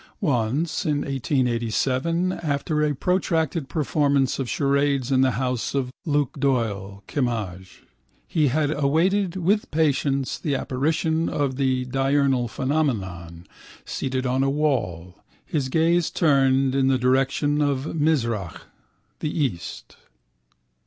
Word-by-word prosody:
Once, 140 - 0
in 145 -2 0
1887, 130 +5 0
after 150 -2 -1
a 150 -1 +1
protracted 165 -3 0
performance 140 -4 +1
of 130 -3 -2
charades 140 -2 +1
in 130 -1 +4
the 130 -2 +3
house 125 0 -2
of 130 -2 -1 0.2
Luke 145 -2 0
Doyle, 105 -7 -1
Kimmage, 105 -9 -3 0.4
he 155 -3 +2
had 145 +2 +1
awaited 170 +6 +1
with 190 +4 +1
patience 140 -3 0
the 145 -3 -1
apparition 160 +5 0
of 140 -3 -1
the 130 -1 0
diurnal 135 -1 +1
phenomenon, 95 - -2 0.4
seated 130 -1 -3
on 130 +1 +1
a 135 - +2
wall, 100 - -1 0.3
his 145 -7 -2
gaze 165 +3 +2
turned 135 -4 +3
in 135 -1 +2
the 135 -1 +3
direction 135 +3 +1
of 140 0 -1
Mizrach, 115 - 0 0.6
the 150 - -2
east. 135 - -4
135 Hz, 120 wpm, -24 LUFS, 125-150 Hz, 0.6 s, in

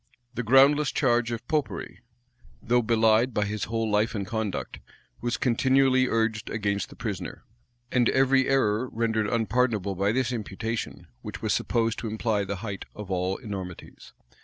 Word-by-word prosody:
The 125 - -2
groundless 135 +4 +5
charge 120 -3 +1
of 115 - -5
Popery, 150 -3 -2 0.6
though 120 +1 +2
belied 115 +1 +3
by 105 - +2
his 105 0 -3
whole 115 +1 -1
life 105 +2 +1
and 100 -2 -2
conduct, 110 0 -3 0.4
was 120 -2 -1
continually 130 +1 +3
urged 110 -2 0
against 100 -3 -1
the - - -13
prisoner; - - -5 0.5
and 125 -2 +3
every 135 0 +3
error 125 -2 +2
rendered 110 -2 0
unpardonable 115 -3 0
by 100 +2 +1
this 130 +1 0
imputation, 110 0 -4 0.2
which - - -8
was - - +1
supposed 115 -1 0
to 115 - -4
imply 110 -1 0
the 100 0 -3
height 100 -2 -5
of 105 -2 -7
all 95 +1 0
enormities. 95 -7 -8
115 Hz, 155 wpm, -26 LUFS, 105-125 Hz, 0.6 s, groundless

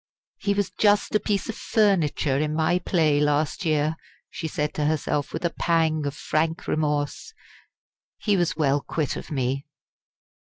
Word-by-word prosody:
"He 200 0 0
was 205 -1 0
just 205 -1 +2
a 215 - +4
piece 205 -1 -1
of 225 - -3
furniture 170 - +1
in 155 0 -1
my 160 +3 +2
play 160 -5 +2
last 150 +3 +1
year," 155 0 +1 0.3
she 165 - -4
said 150 0 -2
to 150 - -1
herself 150 -1 0
with - - -4
a 170 - +1
pang 160 -3 +1
of 140 - -4
frank 160 +5 -1
remorse. 150 - -1 0.8
"He 210 -2 +1
was 175 -4 0
well 145 -2 +2
quit 150 -1 -2
of - - -7
me!" 135 -2 -1
155 Hz, 160 wpm, -25 LUFS, 145-175 Hz, 0.8 s, a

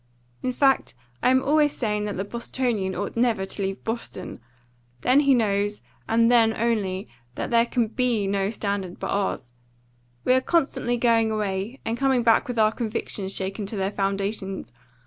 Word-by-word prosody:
"In 255 - -1
fact 270 - +2 0.3
I - - +4
am 260 +1 +4
always 295 0 +3
saying 210 -3 -1
that 205 -2 -4
the 195 - -1
Bostonian 235 -3 -2
ought 200 +2 -4
never 230 -5 +1
to 195 +1 -6
leave 195 0 -3
Boston. 225 +1 -5 0.6
Then 255 +3 +4
he 280 -2 +4
knows 205 -2 0 0.3
and 230 +1 +4
then 225 -2 +4
only 205 -5 -1 0.3
that - - -4
there 235 0 +4
can 240 -2 +1
BE 235 -2 0
no 195 0 0
standard 200 -4 -3
but - - -3
ours. 190 -11 -1 0.7
But - - +2
we - - +6
are 260 - +3
constantly 265 -6 +1
going 230 -2 +3
away, 210 +3 -2
and 230 +1 -2
coming 265 -3 +2
back 230 -1 +4
with 245 -2 -4
our 215 -1 +4
convictions 215 -4 -3
shaken 195 +2 -3
to 210 - -4
their 195 +1 0
foundations. 195 - -2
220 Hz, 175 wpm, -25 LUFS, 195-240 Hz, 0.7 s, we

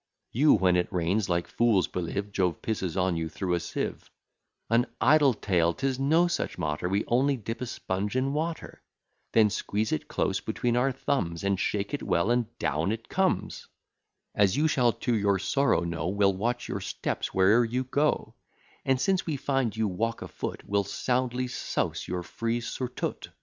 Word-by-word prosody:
You, 145 +6 +5
when 90 -3 +3
it 90 - 0
rains, 95 +3 0
like 85 -1 +1
fools, 115 -6 +2
believe 95 +3 -3
Jove 90 -4 0
pisses 95 -5 -2
on 90 -1 +1
you 80 0 -2
through 90 +2 -2
a 85 - +2
sieve: 85 - -4 0.6
An 115 +2 +3
idle 140 +1 +5
tale, 85 -5 +1
'tis 135 +2 -1
no 160 +6 +4
such 170 - -2
matter; 75 +3 -2
We 100 +2 0
only 135 +3 +2
dip 115 +1 -6
a 125 - -2
sponge 100 -1 -3
in 135 +2 +1
water, 160 +2 -4 0.5
Then 110 -2 +5
squeeze 105 +1 -1
it - - -2
close - - 0
between 120 -1 -1
our 130 +3 +2
thumbs, 100 -11 -2
And 100 -1 +1
shake 100 +4 -1
it 145 - -2
well, 85 +7 +1
and 120 -2 +2
down 80 +6 0
it 115 +1 -5
comes; 190 -1 0 0.7
As 100 +3 +3
you 155 +2 +3
shall 125 -5 +3
to 120 +1 -1
your 100 -2 +2
sorrow 135 +4 +2
know; 85 -2 -3
We'll 100 +1 +2
watch 120 +6 -2
your - - -3
steps - - -3
where'er 100 +6 +5
you 125 +3 -1
go; 145 +4 0 0.5
And, 135 -1 +2
since 185 +7 +1
we 155 - 0
find 135 -5 -1
you 110 -1 +1
walk 115 +5 -2
a - - -6
foot, - - -5
We'll 100 0 +2
soundly 125 +4 -1
souse - - -2
your 90 0 -3
frieze 115 +5 -3
surtout. 125 -1 -4
110 Hz, 180 wpm, -28 LUFS, 95-130 Hz, 0.7 s, You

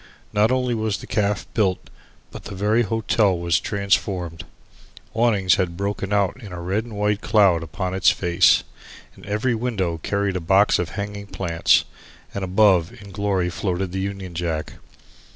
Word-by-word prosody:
Not 105 +1 +3
only 125 -1 +1
was 110 -3 -1
the - - -10
caff 105 -1 -1
built 95 -5 0 0.4
but - - -10
the 100 - -7
very 105 +4 +2
hotel 110 -3 +1
was 85 0 +1
transformed. 95 -4 -1 0.7
Awnings 105 -5 +3
had 85 -3 -1
broken 100 0 -3
out 100 +4 0
in 105 -5 -10
a 90 - -6
red 95 +6 -2
and 115 -3 -9
white 105 0 0
cloud 100 -6 +3
upon 90 +3 -4
its 95 0 +4
face, 85 -2 +3 0.5
its - - -15
every 105 +5 0
window 105 -8 -2
carried 100 +2 -1
a - - -4
box 95 +5 +3
of 90 -2 -2
hanging 100 0 -5
plants, 85 -5 +2 0.5
and 100 - -4
above 95 -3 +3
in 100 -1 -12
glory 95 -3 -1
floated 95 -1 -2
the 95 - -3
Union 95 -2 -5
Jack. 80 -2 -3
100 Hz, 165 wpm, -22 LUFS, 90-105 Hz, 0.7 s, its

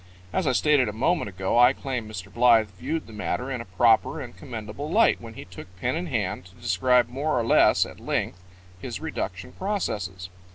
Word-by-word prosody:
As 185 - 0
I - - +4
stated 140 -3 +3
a - - -5
moment 130 - 0
ago, 95 +4 0
I 125 +2 +7
claim 125 -6 -4
Mr. 95 -3 -8
Blythe 115 -3 +5
viewed 155 - -4
the 110 - -13
matter 125 +5 -3
in 125 -3 -3
a - - -8
proper 110 +4 +3
and - - -8
commendable 110 +7 -7
light 225 +7 +3
when 115 -1 -10
he - - -9
took 90 +1 -11
pen 125 +7 0
in 175 +2 -3
hand 100 - -2
to 90 +1 -17
describe 120 +8 +2
more 135 +3 -1
or 115 - -1
less - - +5
at - - -11
length 90 - -2 0.4
his - - -5
reduction 90 -1 -5
processes. 95 - -3
115 Hz, 200 wpm, -25 LUFS, 95-130 Hz, 0.4 s, I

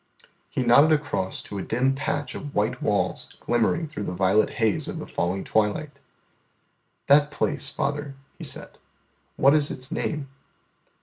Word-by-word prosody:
He 130 - -1
nodded 140 +6 +6
across 145 -11 -1
to 100 - -6
a - - -2
dim 125 +7 +1
patch 145 0 -2
of 145 - -7
white 110 +5 0
walls 105 -1 -1
glimmering 120 +8 +1
through 145 -9 -5
the 90 - -4
violet 95 +3 +3
haze 110 -3 +1
of - - -5
the - - -5
falling 90 +3 -2
twilight. 110 +8 0 1.1
"That 145 +1 +5
place, 150 0 -1
father," 145 0 -3 0.2
He - - -10
said, - - -5 0.6
"what 140 +1 +5
is 150 -1 +3
its 130 +3 -4
name?" 150 -4 -2
135 Hz, 150 wpm, -25 LUFS, 105-145 Hz, 1.1 s, nodded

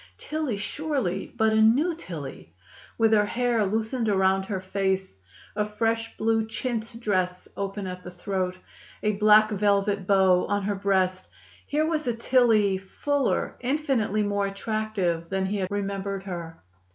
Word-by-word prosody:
Tillie 300 -8 -3
surely, 210 - -2
but 220 0 +3
a 220 - +4
new 270 +11 +4
Tillie! 150 - -8 0.4
With 225 -1 +3
her 210 -1 +4
hair 240 -1 +1
loosened 220 +3 -1
around 190 -1 +2
her 195 -1 -3
face, 190 0 -1 0.4
a 210 - +1
fresh 225 +2 -2
blue 225 0 +1
chintz 225 0 -3
dress 185 -5 -1
open 200 0 -4
at 180 0 -6
the - - -7
throat, 185 0 -3 0.5
a 210 - +3
black 215 +1 +5
velvet 200 -1 +1
bow 190 -2 +4
on 205 0 0
her 205 +1 0
breast, 190 -2 0 0.4
here 305 +2 +1
was 315 -3 -1
a 240 - +1
Tillie 225 -5 +3
fuller, 280 +8 -1
infinitely 245 -6 0
more 205 -1 0
attractive, 195 -5 -2
than 190 0 0
he 200 +2 -1
had 185 -2 -2
remembered 200 -1 -3
her. 170 -4 -7
205 Hz, 150 wpm, -26 LUFS, 190-225 Hz, 0.5 s, black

